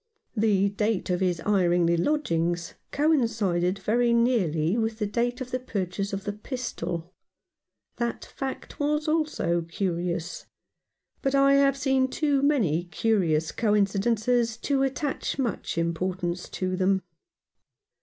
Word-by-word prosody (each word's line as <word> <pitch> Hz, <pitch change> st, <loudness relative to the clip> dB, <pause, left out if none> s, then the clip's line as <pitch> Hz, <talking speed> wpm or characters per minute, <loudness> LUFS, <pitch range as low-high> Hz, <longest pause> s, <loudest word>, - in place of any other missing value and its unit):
The 205 Hz, -3 st, +3 dB
date 205 Hz, -1 st, -1 dB
of 180 Hz, -, +1 dB
his 180 Hz, -3 st, 0 dB
hiring 180 Hz, -4 st, +2 dB
the 170 Hz, +1 st, +3 dB
lodgings 170 Hz, -, 0 dB, 0.2 s
coincided 220 Hz, -, +1 dB
very 235 Hz, +5 st, +2 dB
nearly 195 Hz, -9 st, +2 dB
with 225 Hz, -1 st, -1 dB
the 215 Hz, -, -1 dB
date 240 Hz, +4 st, -1 dB
of 250 Hz, -1 st, -5 dB
the 255 Hz, -, -1 dB
purchase 200 Hz, -5 st, -3 dB
of 195 Hz, 0 st, -4 dB
the 205 Hz, -1 st, -3 dB
pistol. 185 Hz, -, -5 dB, 0.8 s
That 235 Hz, -1 st, -2 dB
fact 270 Hz, -1 st, -6 dB
was 300 Hz, +1 st, 0 dB
also 305 Hz, -, +1 dB
curious; 170 Hz, 0 st, -3 dB, 0.7 s
but 275 Hz, -1 st, +1 dB
I 275 Hz, 0 st, +5 dB
have 275 Hz, -1 st, +4 dB
seen 265 Hz, -1 st, +2 dB
too 285 Hz, 0 st, +1 dB
many 205 Hz, -, +2 dB
curious 175 Hz, -5 st, +1 dB
coincidences 220 Hz, +2 st, +1 dB
to 270 Hz, +3 st, 0 dB
attach 270 Hz, +1 st, -1 dB
much 235 Hz, -9 st, -2 dB
importance 175 Hz, +1 st, -2 dB
to 185 Hz, 0 st, -2 dB
them. 190 Hz, 0 st, +1 dB
210 Hz, 125 wpm, -26 LUFS, 175-255 Hz, 0.8 s, I